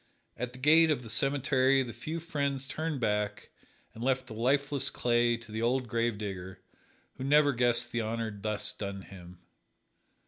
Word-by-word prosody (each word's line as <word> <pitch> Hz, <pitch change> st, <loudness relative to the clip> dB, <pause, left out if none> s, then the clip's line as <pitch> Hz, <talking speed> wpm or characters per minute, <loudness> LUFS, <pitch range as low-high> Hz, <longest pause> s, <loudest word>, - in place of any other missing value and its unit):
At 125 Hz, 0 st, -4 dB
the -, -, -11 dB
gate 160 Hz, +5 st, +5 dB
of 145 Hz, -5 st, 0 dB
the 115 Hz, -, -5 dB
cemetery 135 Hz, +1 st, +2 dB
the 120 Hz, -3 st, -7 dB
few 155 Hz, +9 st, -5 dB
friends 140 Hz, -5 st, -2 dB
turned 155 Hz, 0 st, -3 dB
back 105 Hz, -2 st, -1 dB, 0.4 s
and 115 Hz, -, -8 dB
left 130 Hz, 0 st, +1 dB
the 120 Hz, -, -9 dB
lifeless 135 Hz, +3 st, +1 dB
clay 120 Hz, -1 st, +2 dB
to 115 Hz, -2 st, -14 dB
the 110 Hz, +1 st, -3 dB
old 125 Hz, +2 st, +1 dB
gravedigger, 105 Hz, -5 st, -3 dB, 0.6 s
who 130 Hz, -, -5 dB
never 145 Hz, +1 st, +4 dB
guessed 120 Hz, -1 st, +2 dB
the 120 Hz, -, -1 dB
honor 110 Hz, -1 st, -3 dB
thus 105 Hz, +1 st, -3 dB
done 100 Hz, -1 st, -6 dB
him. 90 Hz, -2 st, -13 dB
120 Hz, 165 wpm, -30 LUFS, 110-140 Hz, 0.6 s, gate